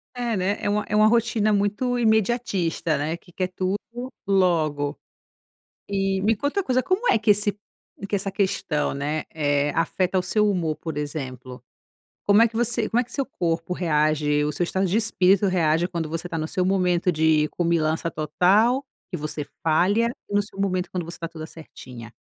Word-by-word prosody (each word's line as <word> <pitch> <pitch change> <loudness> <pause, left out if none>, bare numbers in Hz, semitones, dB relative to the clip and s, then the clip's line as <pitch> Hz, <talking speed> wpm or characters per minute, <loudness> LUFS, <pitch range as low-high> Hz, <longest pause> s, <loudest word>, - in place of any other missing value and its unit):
É, 240 -2 -1
né, 195 +2 0
é - - -1
um 210 +1 +1
é 210 - -1
uma 215 0 +6
rotina 220 -2 +2
muito 205 +5 0
imediatista, 220 -8 +1
né, 155 +3 -2
que 175 +1 -17
quer 185 +1 -2
tudo 185 +2 -2 0.5
logo. 160 -7 +1 0.9
E 195 -1 0
me 220 +3 +2
conta 285 - -1
uma - - 0
coisa 255 -4 +1
como 370 - +1
é - - +4
que 215 -1 +3
esse 205 0 +1 0.5
que 205 - -1
essa 195 0 -2
questão, 190 -8 -1
né, 150 +2 -2
eh, 145 -2 +1
afeta 185 +3 0
o - - +3
seu 210 +3 +2
humor 170 -6 -1
por 160 -3 -6
exemplo? 130 -4 -6 0.6
Como 205 +2 +5
é 230 - +5
que 225 - -9
você 235 -1 0
como 235 - +2
é - - -2
que 240 - -15
seu 275 -2 -1
corpo 170 -7 -2
reage, 150 -3 +1
o 150 - -1
seu 175 - -1
estado 190 +2 0
de 185 +4 0
espírito 200 -3 +3
reage 170 -2 +2
quando 170 -4 -3
você 165 +2 -4
está 170 -2 -4
no 155 0 -3
seu 180 +2 -1
momento 180 -2 +2
de 155 -1 +3
comilança 165 -1 0
total, 200 - +2 0.3
que 180 - -3
você 150 -1 -4 0.2
falha, 195 +9 +2 0.2
e 205 - -6
no 205 - +3
seu 200 -1 -13
momento 185 -2 -1
quando 180 -2 -3
você 170 +1 -8
está 165 - -5
toda 160 -1 -8
certinha? 125 -8 -11
185 Hz, 190 wpm, -24 LUFS, 155-210 Hz, 0.9 s, uma